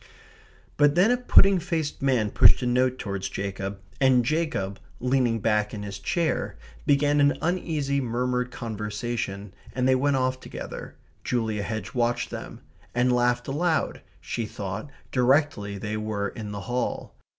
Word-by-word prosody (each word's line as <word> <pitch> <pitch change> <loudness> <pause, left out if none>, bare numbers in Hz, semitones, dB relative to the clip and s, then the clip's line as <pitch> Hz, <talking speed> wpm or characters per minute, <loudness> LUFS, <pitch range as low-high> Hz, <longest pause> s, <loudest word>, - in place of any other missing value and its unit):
But 145 0 +4
then 190 +7 +5
a 245 - +3
pudding 195 -6 +5
faced 160 -3 -2
man 125 -6 +2
pushed - - +6
a - - 0
note 125 +1 +2
towards 100 -4 -3
Jacob, 95 0 -4 0.2
and 130 -3 +4
Jacob, 145 -10 -1 0.2
leaning 125 -2 +2
back 105 -1 +1
in 105 - -5
his 100 -1 -6
chair, 170 - -1 0.3
began 145 +1 +4
an 145 0 +4
uneasy 155 -5 0
murmured 125 +1 -1
conversation, 105 -3 -4 0.2
and 130 0 +1
they 130 - +5
went 140 +2 +2
off 130 0 0
together - - -8 0.3
(Julia 110 -4 -1
Hedge 110 0 -4
watched 120 -1 0
them), - - -7 0.3
and 125 +1 +3
laughed 125 0 +1
aloud 160 +3 0 0.2
(she 115 -2 -3
thought) 100 +5 -5 0.2
directly 125 -6 +2
they 105 +2 -3
were 105 -2 -2
in 105 0 -7
the 100 -1 -5
hall. 125 +4 -3
125 Hz, 150 wpm, -26 LUFS, 105-140 Hz, 0.3 s, pushed